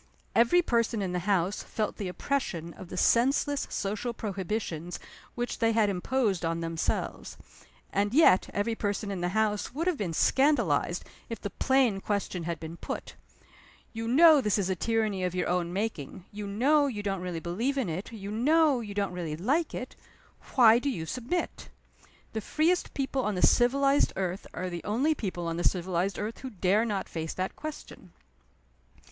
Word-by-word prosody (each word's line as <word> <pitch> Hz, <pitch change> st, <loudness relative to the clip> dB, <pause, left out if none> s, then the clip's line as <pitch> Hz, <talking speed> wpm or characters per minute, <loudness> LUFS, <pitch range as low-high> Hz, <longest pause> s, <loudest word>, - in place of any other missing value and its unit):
Every 240 Hz, +10 st, +4 dB
person 230 Hz, -4 st, +1 dB
in 185 Hz, -, -2 dB
the 180 Hz, -, -1 dB
house 190 Hz, 0 st, +1 dB
felt 215 Hz, -1 st, -3 dB
the 200 Hz, -, -3 dB
oppression 180 Hz, -, -2 dB
of 185 Hz, -, -11 dB
the 180 Hz, -, -6 dB
senseless 275 Hz, +7 st, +2 dB
social 210 Hz, +5 st, -2 dB
prohibitions 190 Hz, -5 st, -3 dB, 0.4 s
which 240 Hz, 0 st, -3 dB
they 225 Hz, -1 st, +3 dB
had 215 Hz, -2 st, +3 dB
imposed 200 Hz, 0 st, 0 dB
on 165 Hz, 0 st, -1 dB
themselves. 165 Hz, -1 st, -3 dB, 0.6 s
And 205 Hz, +1 st, +1 dB
yet 260 Hz, -, +5 dB
every 205 Hz, +3 st, -1 dB
person 205 Hz, -1 st, -2 dB
in 190 Hz, -3 st, -4 dB
the 175 Hz, -, 0 dB
house 215 Hz, +2 st, 0 dB
would 325 Hz, +4 st, -1 dB
have 360 Hz, -4 st, +1 dB
been 180 Hz, -5 st, -2 dB
scandalized 235 Hz, -, +2 dB, 0.2 s
if 230 Hz, -2 st, -5 dB
the 205 Hz, -, -5 dB
plain 260 Hz, -7 st, +2 dB
question 195 Hz, -4 st, -2 dB
had 170 Hz, -2 st, -3 dB
been 165 Hz, +1 st, -7 dB
put: -, -, -6 dB, 0.8 s
You 225 Hz, 0 st, -4 dB
know 305 Hz, +4 st, +7 dB
this 210 Hz, -4 st, +1 dB
is 190 Hz, -2 st, 0 dB
a -, -, 0 dB
tyranny 215 Hz, -1 st, 0 dB
of 180 Hz, 0 st, -1 dB
your 180 Hz, -, 0 dB
own 175 Hz, -1 st, 0 dB
making, 190 Hz, -4 st, -4 dB
you 205 Hz, 0 st, -6 dB
know 280 Hz, +9 st, +3 dB
you 210 Hz, -6 st, -4 dB
don't 195 Hz, -2 st, -2 dB
really 180 Hz, -2 st, -3 dB
believe 225 Hz, +12 st, -2 dB
in 260 Hz, -6 st, 0 dB
it, 175 Hz, +6 st, -4 dB
you 205 Hz, -3 st, -7 dB
know 290 Hz, +4 st, +3 dB
you 205 Hz, -3 st, -7 dB
don't 200 Hz, -2 st, -1 dB
really 165 Hz, -4 st, -4 dB
like 285 Hz, -, 0 dB
it 255 Hz, -, -6 dB, 0.6 s
why 235 Hz, -2 st, +7 dB
do 280 Hz, -, -1 dB
you 165 Hz, -12 st, -3 dB
submit? 255 Hz, -, -3 dB, 0.6 s
The 220 Hz, -, -2 dB
freest 330 Hz, -, 0 dB
people 270 Hz, -1 st, -1 dB
on 210 Hz, -2 st, -1 dB
the 180 Hz, -, -2 dB
civilized 275 Hz, +3 st, +3 dB
earth 185 Hz, 0 st, -3 dB
are 185 Hz, -, -4 dB
the 170 Hz, -1 st, -5 dB
only 255 Hz, +10 st, +1 dB
people 185 Hz, -, -4 dB
on 165 Hz, 0 st, -2 dB
the 175 Hz, -, -2 dB
civilized 185 Hz, +1 st, 0 dB
earth 215 Hz, +2 st, -4 dB
who 260 Hz, -, -6 dB
dare 205 Hz, +1 st, +2 dB
not 205 Hz, -4 st, -2 dB
face 160 Hz, -1 st, -5 dB
that 185 Hz, +1 st, -3 dB
question. 310 Hz, -1 st, -9 dB
205 Hz, 180 wpm, -29 LUFS, 180-250 Hz, 0.8 s, know